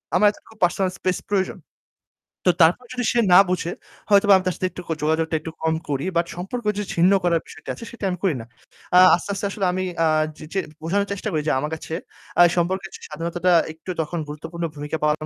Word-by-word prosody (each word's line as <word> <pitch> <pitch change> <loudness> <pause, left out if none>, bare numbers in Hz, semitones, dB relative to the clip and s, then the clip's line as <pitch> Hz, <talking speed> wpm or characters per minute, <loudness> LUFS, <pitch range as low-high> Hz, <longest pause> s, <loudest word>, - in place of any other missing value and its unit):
আমার 210 - +5
এতটুকু 220 - -19
personal 185 +1 +2
space 185 -1 -1
প্রয়োজন। 190 -2 0 0.9
তো - - +8
তারপর 175 +10 +4
যদি 250 -1 -2
সে 240 - +2
না 180 - +10
বুঝে, 175 -1 -1 0.4
হয়তোবা 200 0 +6
আমি 185 - -3
তার 185 - 0
সাথে 185 - -1
একটুকু 180 -2 -7
যোগাযোগটা 160 +1 +1
একটু 160 +1 -7
কম 160 0 +2
করি। 140 +3 -1
বাট 170 - +2
সম্পর্ক 195 +7 -5 0.3
ছিন্ন 175 +3 +5
করার 170 -2 +2
বিষয়টা - - -12
আছে, 230 - -9
সেটা 235 - -11
আমি 180 - -2
করি 185 -7 +2
না। - - -10 0.5
আ - - +8 0.2
আস্তে, 175 - -7
আস্তে 200 - -3
আসলে 200 -1 -2
আমি 185 +1 -1 0.2
আ - - +4 0.3
যে - - -9
যে 195 - +1 0.2
বোঝানোর 200 +5 0
চেষ্টা 200 - -4
করি 155 - 0
যে - - +3
আমার 150 +3 -3
কাছে 160 - -8 0.5
আ - - +9 0.2
সম্পর্কের 190 +3 0
চেয়ে - - -10
স্বাধীনতাটা 170 +3 -1 0.2
একটু 160 +3 -14
তখন 165 +2 -4
গুরুত্বপূর্ণ 160 +3 -6
ভূমিকা 150 +2 -4
পালন 150 0 +1
175 Hz, 210 wpm, -23 LUFS, 160-195 Hz, 0.9 s, না